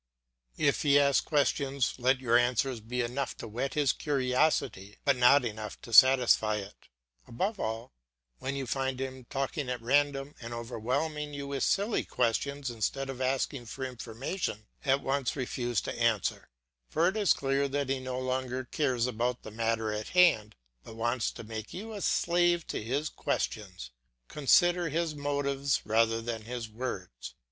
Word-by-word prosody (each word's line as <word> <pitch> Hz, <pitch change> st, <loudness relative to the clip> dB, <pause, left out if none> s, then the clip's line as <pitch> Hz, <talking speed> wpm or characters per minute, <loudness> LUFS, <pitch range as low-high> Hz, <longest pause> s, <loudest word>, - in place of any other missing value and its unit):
If 140 Hz, -1 st, +2 dB
he 145 Hz, -2 st, +5 dB
asks 140 Hz, -1 st, +4 dB
questions 140 Hz, -3 st, +1 dB
let 130 Hz, +1 st, +3 dB
your 120 Hz, -2 st, +2 dB
answers 120 Hz, +1 st, +2 dB
be 120 Hz, +3 st, -3 dB
enough 125 Hz, +4 st, -3 dB
to -, -, -7 dB
whet 120 Hz, +5 st, -3 dB
his 145 Hz, -4 st, +3 dB
curiosity 125 Hz, -7 st, 0 dB
but 140 Hz, -2 st, +4 dB
not 125 Hz, +2 st, +5 dB
enough 110 Hz, -2 st, -5 dB
to 115 Hz, -, -9 dB
satisfy 125 Hz, -4 st, +6 dB
it; 100 Hz, -1 st, -8 dB, 0.4 s
above 195 Hz, -, -2 dB
all, 115 Hz, +3 st, -4 dB, 0.5 s
when 135 Hz, +1 st, -3 dB
you 135 Hz, -1 st, -3 dB
find 130 Hz, +1 st, -2 dB
him 130 Hz, -1 st, -5 dB
talking 135 Hz, +1 st, -3 dB
at 125 Hz, -1 st, -2 dB
random 140 Hz, +3 st, +1 dB
and 120 Hz, 0 st, -6 dB
overwhelming 130 Hz, +6 st, -3 dB
you 140 Hz, 0 st, -5 dB
with 140 Hz, -1 st, -3 dB
silly 205 Hz, +3 st, +1 dB
questions 140 Hz, +3 st, -1 dB
instead 135 Hz, +4 st, -2 dB
of 130 Hz, -1 st, -8 dB
asking 130 Hz, -1 st, -1 dB
for 130 Hz, +4 st, -5 dB
information, 125 Hz, -, -4 dB, 0.2 s
at 135 Hz, 0 st, +2 dB
once 135 Hz, -2 st, -1 dB
refuse 120 Hz, -4 st, -1 dB
to -, -, -4 dB
answer; -, -, 0 dB, 0.4 s
for 165 Hz, +3 st, +2 dB
it 190 Hz, -, 0 dB
is 205 Hz, -5 st, +3 dB
clear 135 Hz, +1 st, +1 dB
that 140 Hz, 0 st, -2 dB
he 135 Hz, -1 st, 0 dB
no 130 Hz, 0 st, -4 dB
longer 130 Hz, 0 st, -2 dB
cares 125 Hz, -3 st, 0 dB
about 125 Hz, 0 st, -1 dB
the 110 Hz, -, -8 dB
matter 115 Hz, -1 st, -1 dB
in 105 Hz, 0 st, -3 dB
hand, 170 Hz, -13 st, +4 dB, 0.3 s
but 110 Hz, -, -11 dB
wants 120 Hz, +1 st, 0 dB
to -, -, -9 dB
make 110 Hz, -1 st, -7 dB
you 220 Hz, +4 st, -6 dB
a 205 Hz, -, -6 dB
slave 175 Hz, -1 st, +2 dB
to -, -, -4 dB
his 140 Hz, +7 st, -1 dB
questions. -, -, -3 dB, 0.4 s
Consider 175 Hz, +4 st, +3 dB
his 165 Hz, +1 st, -1 dB
motives 140 Hz, -1 st, -1 dB
rather 115 Hz, +1 st, +2 dB
than 115 Hz, -2 st, -4 dB
his 120 Hz, -1 st, -5 dB
words. 110 Hz, -, -6 dB
130 Hz, 165 wpm, -30 LUFS, 115-140 Hz, 0.5 s, satisfy